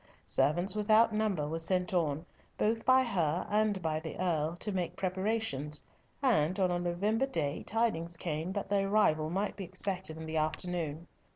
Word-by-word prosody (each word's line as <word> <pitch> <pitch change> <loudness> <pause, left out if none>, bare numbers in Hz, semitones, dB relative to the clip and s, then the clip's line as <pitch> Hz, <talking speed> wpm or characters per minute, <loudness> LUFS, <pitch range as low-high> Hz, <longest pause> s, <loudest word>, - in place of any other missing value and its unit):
Servants 175 +7 +2
without 215 +2 +4
number 210 -9 0
were 165 +2 -2
sent 180 +2 +1
on, 160 -2 0 0.3
both 225 +1 +1
by 260 0 +6
her 175 -8 0
and 210 -1 +2
by 155 -1 0
the 160 -1 -7
Earl, 165 -3 0
to 210 +4 -3
make 180 -2 -2
preparations, 185 -6 -1 0.4
and 185 - +2
on 185 -2 +3
a 175 - 0
November 200 +9 0
day, 150 - -1
tidings 175 -7 -1
came 160 +1 -3
that 200 -1 -4
the 200 - +3
arrival 195 -6 +2
might 195 +4 -1
be 195 - -6
expected 185 -2 -3
in 160 - -7
the 160 0 -3
afternoon. 160 0 -2
180 Hz, 170 wpm, -32 LUFS, 160-210 Hz, 0.4 s, by